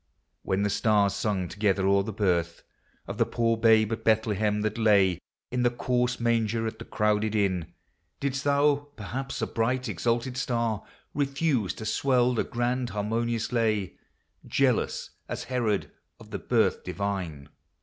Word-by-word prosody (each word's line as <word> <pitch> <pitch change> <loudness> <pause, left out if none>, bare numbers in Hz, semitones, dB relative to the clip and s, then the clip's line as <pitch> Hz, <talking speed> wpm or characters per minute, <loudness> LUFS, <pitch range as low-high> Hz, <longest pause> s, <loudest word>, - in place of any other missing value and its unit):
When 95 +2 0
the 105 - +1
stars 105 -2 +3
sang 100 -3 -1
together 100 -1 0
o'er 100 0 +4
the 105 +3 -4
birth 90 -5 0 0.4
Of - - -6
the - - +4
poor 115 -1 +1
Babe 110 -1 +4
at 110 0 -5
Bethlehem, 105 -1 +2
that 110 +2 -2
lay 100 -5 +4 0.3
In 125 0 0
the 120 - +4
coarse 125 0 0
manger 115 -1 +1
at 110 0 -4
the - - -8
crowded 105 0 0
Inn, 95 -6 0 0.5
Didst 140 -1 -2
thou, 145 0 +2
perhaps 130 +5 -4
a - - +3
bright 125 +3 -1
exalted 115 +6 -1
star, 115 -5 -1 0.3
Refuse 140 - 0
to 110 - -7
swell 125 +1 +2
the 120 - +1
grand, 120 +1 -1
harmonious 115 +2 -1
lay, 110 -5 0 0.5
Jealous - - 0 0.2
as - - -4
Herod 115 -6 -1 0.3
of - - -14
the - - -3
birth - - +1
divine 90 -8 -4
110 Hz, 150 wpm, -27 LUFS, 100-120 Hz, 0.5 s, o'er